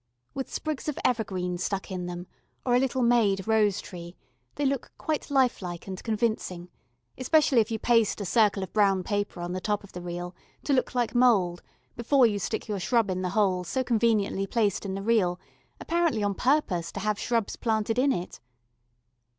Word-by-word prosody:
With 270 -1 -5
sprigs 310 -1 -3
of 300 - -4
evergreen 185 -7 -1
stuck 195 +1 -3
in 180 -1 -4
them, 175 0 -6 0.4
or 245 - +2
a 245 - +5
little 260 -1 0
made 215 -5 +3
rose 215 -3 +3
tree, 175 -1 -9 0.4
they 290 - -1
look 275 -1 -1
quite 310 -1 -3
life 265 -5 +2
like 175 -2 -6
and 190 -1 -6
convincing, 215 -6 -2 0.5
especially 270 -2 +4
if 215 - -2
you 225 - -1
paste 230 -2 +2
a 200 - -3
circle 205 0 +3
of 190 - -8
brown 195 -3 +3
paper 205 -2 -2
on 175 0 -4
the 185 - -3
top 205 0 -1
of 200 - -14
the 180 - -7
reel, 175 +1 -5 0.3
to 285 - 0
look 255 -1 0
like 240 -2 0
mould, 205 -9 +3 0.3
before 250 +2 +4
you 210 -3 +1
stick 220 +5 -3
your 205 -2 -2
shrub 225 +1 +1
in 185 0 -2
the 180 - -1
hole 185 -3 +2
so 260 +9 -1
conveniently 220 -5 +1
placed 210 -2 0
in 190 - -3
the 195 - -5
reel, 195 -6 +2 0.4
apparently 330 -10 0
on 200 0 +1
purpose 195 - +1
to - - -4
have 210 -1 -1
shrubs 230 -3 -1
planted 225 0 0
in 275 +2 +3
it. 180 -8 -4
210 Hz, 190 wpm, -27 LUFS, 185-245 Hz, 0.5 s, a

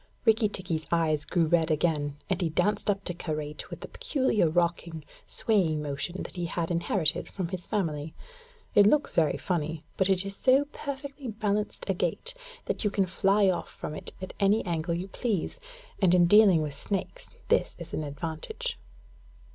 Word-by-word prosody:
Rikki 220 -1 +4
tikki's 170 -5 -3
eyes 155 -3 +2
grew 175 -2 +2
red 165 0 +2
again, 150 -2 0
and 190 -3 0
he 170 - +1
danced 205 +7 +1
up 200 -1 +1
to 180 - -2
Karait 155 -3 -4
with - - -8
the - - -6
peculiar 255 - +1
rocking, 170 -2 -1 0.2
swaying 180 -9 +1
motion 150 +5 -3
that - - -9
he 175 - -1
had 165 +1 -2
inherited 170 -1 0
from 185 -4 -4
his 180 -1 -5
family. 160 -7 -2 0.6
It 205 -1 +7
looks 295 +6 +3
very 160 -3 +2
funny, 160 -3 -2
but 190 0 +2
it 190 0 +2
is 195 0 -2
so 265 +6 +4
perfectly 280 -1 -6
balanced 210 -1 -2
a 195 - +2
gait 180 - -1 0.3
that - - -2
you 210 - +3
can 195 -1 +1
fly 195 +2 +3
off 185 - 0
from - - -6
it - - -7
at 185 - -6
any 205 +2 +3
angle 170 0 -1
you 180 +3 -4
please; 205 -2 -2 0.4
and 180 -2 +5
in 175 -1 +6
dealing 195 -3 +6
with 150 -2 -4
snakes 200 - -4 0.2
this - - +2
is 170 -1 -9
an 155 - -1
advantage. 165 - -4
180 Hz, 180 wpm, -28 LUFS, 160-205 Hz, 0.6 s, It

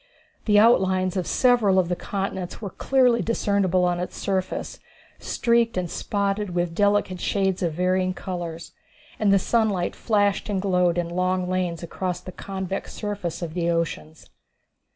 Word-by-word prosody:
The 210 -2 +4
outlines 190 -4 +4
of 185 -2 -1
several 240 -7 +3
of 185 -2 +3
the 180 - -1
continents 190 -1 -4
were 200 -4 -6
clearly 250 -3 +2
discernible 200 -5 +1
on 175 -1 0
its 180 - -5
surface, 190 -1 -3 0.4
streaked 235 -3 +1
and 180 -2 -2
spotted 200 -2 -2
with 175 -1 0
delicate 205 -1 +1
shades 190 -2 0
of 170 -3 0
varying 185 +2 0
color, 175 -3 -5 0.6
and 210 -2 +3
the 200 - +6
sunlight 200 -3 0
flashed 205 -2 +1
and 200 -2 0
glowed 180 -3 +2
in 175 -1 0
long 185 +1 0
lanes 180 -2 -2
across 180 +1 -3
the 180 +1 -9
convex 190 0 -5
surface 205 -5 -4
of 160 -2 -5
the 170 -1 0
oceans. 160 - -3
185 Hz, 150 wpm, -24 LUFS, 180-205 Hz, 0.6 s, the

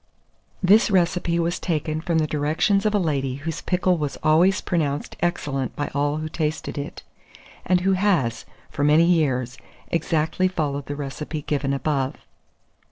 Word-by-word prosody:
This 205 +5 +5
recipe 175 -2 +1
was 170 +1 0
taken 155 -2 -2
from 170 0 0
the 155 - +2
directions 155 +8 +1
of 210 - 0
a - - +5
lady 140 -8 -1
whose 150 +3 -5
pickle 180 -1 +1
was 145 -2 -3
always 170 +6 +4
pronounced 150 -5 -2
excellent 145 -6 -1
by 145 - -3
all 145 +1 0
who 155 0 -3
tasted 155 -1 -3
it, 145 -1 -6 0.6
and 180 0 +3
who 190 +1 +2
has, 180 - +1 0.3
for 145 - -2
many 150 +3 +5
years, 135 -7 +1 0.3
exactly 165 +2 +1
followed 145 -6 -2
the 145 - -4
recipe 150 +2 -5
given 140 -2 -1
above. 140 -1 -1
155 Hz, 155 wpm, -23 LUFS, 145-175 Hz, 0.6 s, This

